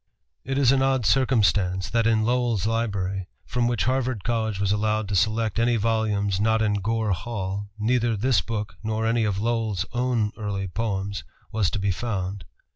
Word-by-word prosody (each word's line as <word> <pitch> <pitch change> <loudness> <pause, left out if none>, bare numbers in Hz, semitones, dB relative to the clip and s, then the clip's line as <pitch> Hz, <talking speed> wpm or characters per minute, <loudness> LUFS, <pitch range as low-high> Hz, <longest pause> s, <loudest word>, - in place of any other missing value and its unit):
It 135 +1 -2
is 135 -3 +5
an 135 -1 +3
odd 135 -3 +2
circumstance 100 -8 +2
that 115 -1 +2
in 110 -1 +3
Lowell's 120 -4 +1
library, 100 -5 -1 0.2
from 120 -1 0
which 120 -2 0
Harvard 130 -4 0
College 110 -4 -1
was 100 -1 +1
allowed 105 0 0
to 105 - -1
select 110 +2 +1
any 120 +1 +3
volumes 105 -3 0
not 110 +1 +3
in 105 -2 +1
Gore 110 +1 0
Hall, 100 0 -3
neither 115 +1 +1
this 120 -2 +2
book 105 -4 -4
nor 110 0 -1
any 115 0 +2
of 100 -2 0
Lowell's 110 -4 0
own 120 -3 +1
early 100 -2 -2
poems 100 -1 -3 0.3
was 105 -4 +1
to - - -3
be 100 0 0
found. 95 -3 -3
110 Hz, 175 wpm, -25 LUFS, 100-115 Hz, 0.3 s, is